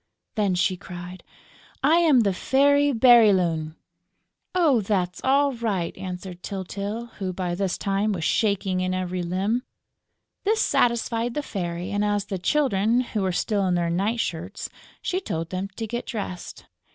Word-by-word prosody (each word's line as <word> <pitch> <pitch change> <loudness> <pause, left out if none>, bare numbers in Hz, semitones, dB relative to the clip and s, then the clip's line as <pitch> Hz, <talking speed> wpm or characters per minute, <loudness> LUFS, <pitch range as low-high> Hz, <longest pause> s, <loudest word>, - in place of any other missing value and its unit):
Then 205 -4 +1
she 185 +1 +1
cried: 180 +1 -9 0.6
"I 310 +5 +5
am 310 -8 +5
the 200 -3 +2
Fairy 285 +7 +3
Bérylune!" 195 - +4 0.8
"Oh, 305 -10 +4
that's 185 -3 -1
all 280 +1 +3
right!" 210 -8 -2
answered 180 -1 -7
Tyltyl, 200 +5 -5
who, 190 -2 -2
by 180 -1 -3
this 190 0 -1
time, 200 +2 0
was 180 -5 -3
shaking 195 -2 +1
in 185 0 0
every 185 0 -2
limb. 190 +7 0 0.8
This 435 +2 +2
satisfied 235 0 +1
the 295 - -1
Fairy; 175 -4 -4
and, 205 0 0
as 205 -1 0
the 195 -2 -4
Children 240 0 +2
were 195 -4 0
still 200 +2 0
in 180 - +2
their 170 -1 0
night 205 +7 0
shirts, 180 -1 -4 0.3
she 370 - 0
told 165 - -4
them 185 +1 -2
to 225 - -3
get 235 +2 -4
dressed. 190 -5 -6
200 Hz, 150 wpm, -25 LUFS, 180-235 Hz, 0.8 s, I